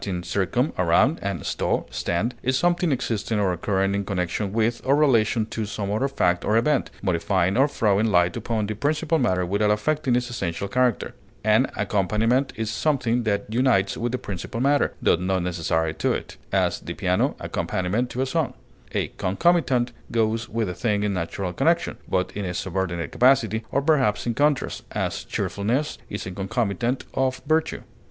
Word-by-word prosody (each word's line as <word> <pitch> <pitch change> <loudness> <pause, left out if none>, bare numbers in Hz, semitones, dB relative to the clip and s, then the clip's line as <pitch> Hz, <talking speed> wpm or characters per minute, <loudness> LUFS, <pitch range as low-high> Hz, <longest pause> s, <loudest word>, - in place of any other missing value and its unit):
circum, 100 - 0
around, 110 - +3
and 100 0 -3
sto, - - -1
stand), 100 +9 -1
is 130 +1 +1
something 175 +2 +2
existing 115 -4 -1
or 95 -3 +2
occurring 95 +2 0
in 100 0 0
connection 95 +1 -2
with 115 +2 0
or 135 +2 +3
relation 115 -6 +3
to 110 0 -4
some 100 -1 -3
other 110 +6 +1
fact 90 -10 +1
or 110 - +2
event, 135 +3 +2
modifying 95 0 +1
or 135 +3 +5
throwing 110 -6 +2
light 90 -4 +3
upon 110 -3 -1
the 110 - -3
principal 155 +7 0
matter 95 -8 +1
without 100 +3 +1
affecting 130 +5 +1
its 125 0 0
essential 100 -4 -3
character; 125 +1 +1 0.3
an - - +4
accompaniment 115 +7 +1
is 110 -1 -2
something 125 -1 +1
that 100 -2 0
unites 115 -6 +2
with 120 0 -2
the 130 - -1
principal 95 +1 -6
matter, 140 +3 +2
tho - - +4
not 90 0 -1
necessary 80 -2 0
to - - 0
it; - - -4 0.2
as, - - +1
the - - -7
piano - - +1
accompaniment 100 +7 -1
to 130 +2 -1
a - - 0
song; 130 - -1 0.4
a - - 0
concomitant 125 - +2 0.2
goes 115 +1 0
with 115 -1 -1
a 90 - -3
thing 105 +1 0
in 105 -1 0
natural 90 +1 -3
connection, 170 - +1
but 90 0 0
in 105 - -4
a 90 -1 -3
subordinate 90 -4 -2
capacity, 115 -4 +3
or 140 - 0
perhaps 140 -9 +2
in 120 - 0
contrast; 145 +2 +1
as, - - -2
cheerfulness 120 +10 -1
is 105 - -5
a 95 - -5
concomitant 115 +5 -1
of 130 -1 0
virtue. 160 +2 0
110 Hz, 175 wpm, -24 LUFS, 95-130 Hz, 0.4 s, or